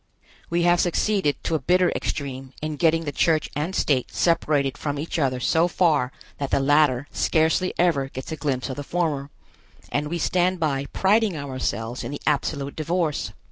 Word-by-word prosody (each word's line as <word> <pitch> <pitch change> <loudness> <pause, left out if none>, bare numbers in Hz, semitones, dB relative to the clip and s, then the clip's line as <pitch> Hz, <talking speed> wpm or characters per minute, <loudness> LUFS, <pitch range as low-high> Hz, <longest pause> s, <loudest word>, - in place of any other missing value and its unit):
We 170 0 +1
have 175 0 +4
succeeded, 180 -3 +1
to - - -2
a 160 - +2
bitter 180 +5 +3
extreme, 135 -2 -4
in 155 0 -3
getting 165 0 +3
the 145 - -3
church 155 +2 +1
and 155 +6 -2
state 130 -4 +1
separated 150 -5 +1
from 145 -1 -3
each 160 +3 -3
other 130 -3 +1
so 160 +7 +2
far 155 -8 +2 0.3
that 140 -1 -2
the - - +2
latter 145 -1 +3
scarcely 160 +3 +2
ever 150 -6 +2
gets 130 +2 -7
a - - -2
glimpse 140 -4 -2
of 130 - -6
the 145 - -4
former, 150 -4 -1 0.6
and 145 +1 0
we 170 +3 -2
stand 180 +2 +1
by 140 -4 0
priding 205 -2 +2
ourselves 130 -4 -3
in - - -4
the 145 - -6
absolute 140 -1 -1
divorce. 160 -1 -1
150 Hz, 180 wpm, -24 LUFS, 140-170 Hz, 0.6 s, have